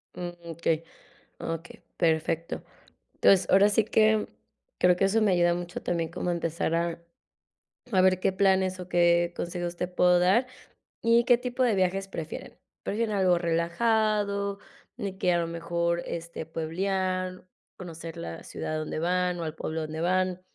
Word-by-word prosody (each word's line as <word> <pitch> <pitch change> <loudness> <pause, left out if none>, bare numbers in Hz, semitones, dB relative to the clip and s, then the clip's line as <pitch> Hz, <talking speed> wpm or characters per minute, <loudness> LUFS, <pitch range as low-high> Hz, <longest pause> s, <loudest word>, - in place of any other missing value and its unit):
Mm, 175 -1 -4 0.2
okey, 165 0 0 0.6
okey, 165 +1 -6
perfecto. 165 0 0 0.5
Entonces, 195 -2 +4
ahora 200 +2 +6
sí 210 +2 +3
que 215 0 +3 0.5
creo 180 0 +4
que 195 - +2
eso 220 +3 +2
me 205 -3 +3
ayuda 175 -1 +3
mucho 175 0 -5
también 165 -2 -1
como 180 +1 -3
a - - +2
empezar 165 -1 -2
a 170 0 -1 0.9
a 190 -3 +4
ver 185 -1 +4
qué 190 - +2
planes 190 -1 +2
o 180 - -7
qué 175 -1 +3
consejos 175 0 -4
te 180 +1 -2
puedo 180 0 +3
dar 190 +8 +4 0.6
y, 230 +1 +4
¿qué 245 -1 +6
tipo 250 +1 -3
de 235 -4 +3
viajes 190 +1 0
prefieren? 160 -4 -7 0.3
¿Prefieren 215 +1 -1
algo 185 -3 +3
relajado? 200 +4 +1 0.4
Y 190 -1 -5
que 180 - +2
a 175 - +2
lo 170 - 0
mejor, 170 +1 -1
este, 170 -1 -5
¿pueblear, 185 +3 -2 0.3
conocer 165 -2 -8
la 85 0 -7
ciudad - - -5
a - - -1
donde 155 0 -4
van 180 +1 0
o - - -2
el 155 - -5
pueblo 160 0 -4
a - - -2
donde 155 +1 -5
van? 185 +1 +1
180 Hz, 165 wpm, -27 LUFS, 170-195 Hz, 0.9 s, ahora